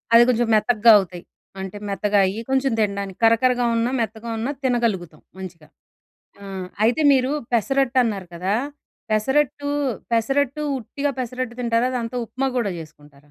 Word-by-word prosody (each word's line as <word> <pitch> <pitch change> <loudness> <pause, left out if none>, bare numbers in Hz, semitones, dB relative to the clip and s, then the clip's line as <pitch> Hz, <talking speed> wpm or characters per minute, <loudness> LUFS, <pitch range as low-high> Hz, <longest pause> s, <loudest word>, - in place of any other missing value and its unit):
అది 235 - +9
కొంచెం 240 -1 +2
మెత‌కగా 220 +1 +4
అవుతాయి. 175 -2 -6 0.4
అంటే 190 +1 -6
మెత్తగా 205 +1 0
అయ్యి, 195 +4 -3
కొంచెం 265 0 +1
తినడానికి. 200 -2 -2
కరకరగా 245 +2 +3
ఉన్నా 230 +2 0
మెత్తగా 220 +1 -4
ఉన్నా 245 +6 -2
తినగలుగుతాం 220 - -1 0.2
మంచిగా. 170 -5 -9 0.8
ఆహ్, 190 -2 -6 0.2
అయితే 245 +7 +2
మీరు 260 0 +2 0.2
పెసరట్టన్నారు 245 -4 +1
కదా! 185 +4 -1 0.6
పెసరట్టు, 285 +6 +1 0.4
పెసరట్టు 275 +5 +1 0.2
ఉట్టిగా 280 +5 -3
పెసరట్టు 250 -1 -4
తింటారా? 235 0 +1
దాంతో 235 0 -4
ఉప్మా 270 +4 -2
గూడా 220 -5 0
జేసుకుంటారా? 150 -2 -14
230 Hz, 130 wpm, -22 LUFS, 195-255 Hz, 0.8 s, అది